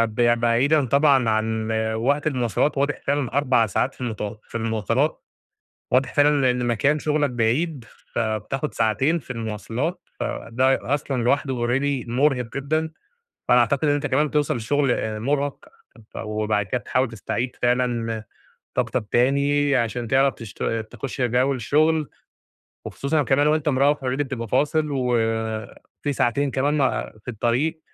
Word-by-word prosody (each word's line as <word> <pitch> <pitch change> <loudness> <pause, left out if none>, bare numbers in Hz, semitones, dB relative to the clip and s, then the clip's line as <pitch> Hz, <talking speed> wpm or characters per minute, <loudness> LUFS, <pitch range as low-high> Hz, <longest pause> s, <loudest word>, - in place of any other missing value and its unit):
ب 120 -1 +3
بعيدًا 130 +5 +3
طبعًا 140 -2 +4
عن 110 0 0 0.3
وقت 140 +6 +1
المواصلات 130 +1 0
واضح 140 +1 0
فعلًا 140 -3 0
4 125 -5 +3
ساعات 130 +8 0
في - - -15
المت 110 -3 -4
في - - -15
المواصلات، 115 +6 0 0.7
واضح 125 0 +2
فعلًا 145 -3 +4
إن 125 0 -1
مكان 140 +6 +2
شغلك 150 -2 0
بعيد، 125 +4 0 0.3
فبتاخد 115 +6 -2
ساعتين 115 +9 +1
في 130 - -16
المواصلات، 115 - -3 0.2
فده 130 +3 0
أصلًا 135 -3 -2
لوحده 125 -1 0
already 135 0 0
مرهق 125 -1 0
جدًا، 155 +3 -1 0.6
فأنا 125 - +6
أعتقد 135 +6 +2
إن 145 - +4
أنت 145 0 -1
كمان 145 +3 +2
بتوصل 145 -4 0
شغل 120 -4 0
مرهق، 140 +4 -1 0.6
وبعد 105 -1 -1
كده 125 - -1
بتحاول 130 -1 0
تستعيد 120 +3 -3
فعلًا 120 -3 0 0.5
طاقتك 120 -2 -1
تاني 140 +3 +3
عشان 120 0 -1
تعرف 135 +1 +3
تشت 115 -3 -9 0.3
تخش 125 +3 -6
جو 125 +3 +2
الشغل، 150 +5 +1 0.8
وخصوصًا 150 +2 -1
كمان 140 +2 +2
وأنت 155 0 +2
مروّح 140 +2 +3
already 135 - -11 0.2
بتبقى 125 -5 -5
فاصل، 150 +5 +1
وفي 115 +1 -2
ساعتين 140 +3 +1
كمان 140 +4 0
م - - +1 0.4
في - - -14
الطريق، 125 +8 0
130 Hz, 135 wpm, -23 LUFS, 115-145 Hz, 0.8 s, فأنا